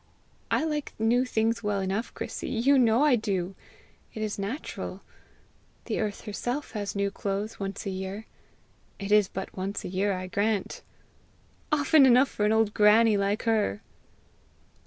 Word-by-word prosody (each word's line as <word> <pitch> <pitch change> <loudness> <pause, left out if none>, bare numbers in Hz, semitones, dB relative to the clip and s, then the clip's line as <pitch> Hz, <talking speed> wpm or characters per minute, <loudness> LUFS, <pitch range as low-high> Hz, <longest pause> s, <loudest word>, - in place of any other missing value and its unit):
"I - - +1
like 300 -2 -3
new 235 +3 +2
things 225 -1 0
well 210 -2 -1
enough, 195 +4 -2
Chrissy - - -5
you 265 +4 +3
know 235 +2 +4
I 290 -4 +5
do! 195 -5 -2 0.6
It 220 - -3
is 210 -1 -3
natural. 220 +10 -5 0.8
The - - -2
earth 210 -2 -2
herself 245 +6 -4
has 205 -2 -4
new 200 0 0
clothes 200 +2 -4
once 195 +2 -5
a 195 - -2
year. 190 +3 -5 0.7
It 200 0 -5
is 210 -2 +5
but 190 0 -7
once 195 +2 -4
a - - -4
year, 195 +2 0
I 185 0 -4
grant!" 200 +2 -1 0.9
"Often 290 -1 +5
enough 255 +2 +5
for 210 - 0
an - - +2
old 220 -1 +2
granny 215 +1 +5
like 200 +1 0
her!" 215 - 0
210 Hz, 155 wpm, -27 LUFS, 200-230 Hz, 0.9 s, I